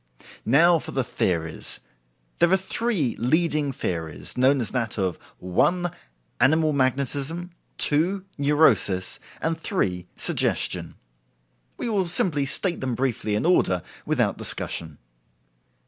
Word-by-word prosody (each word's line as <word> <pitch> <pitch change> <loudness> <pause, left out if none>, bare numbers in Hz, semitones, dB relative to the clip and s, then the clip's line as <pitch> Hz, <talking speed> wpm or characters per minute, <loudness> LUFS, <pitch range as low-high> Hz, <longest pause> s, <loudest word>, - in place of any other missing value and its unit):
Now 165 +7 +5
for - - -9
the 135 - +1
theories. 80 -8 -2 0.6
There 170 0 +4
are 190 - +5
three 190 - -1
leading 150 +2 +1
theories, 80 - -4
known 130 +2 +3
as 115 - -3
that 115 -5 -2
of 95 -4 -1 0.2
1. 175 - +1 0.5
Animal 155 +1 +3
Magnetism; 140 +6 -1 0.3
2. 180 +6 +4
Neurosis; 140 -10 +2 0.2
and 165 +1 0
3. 95 - -2
Suggestion. - - -1 0.8
We - - -3
will 200 -5 0
simply 150 -5 +1
state 175 +5 0
them 130 -2 -2
briefly 120 -5 -1
in 105 - -1
order 95 - +2 0.2
without - - 0
discussion. 80 -3 -3
140 Hz, 115 wpm, -24 LUFS, 110-170 Hz, 0.8 s, Now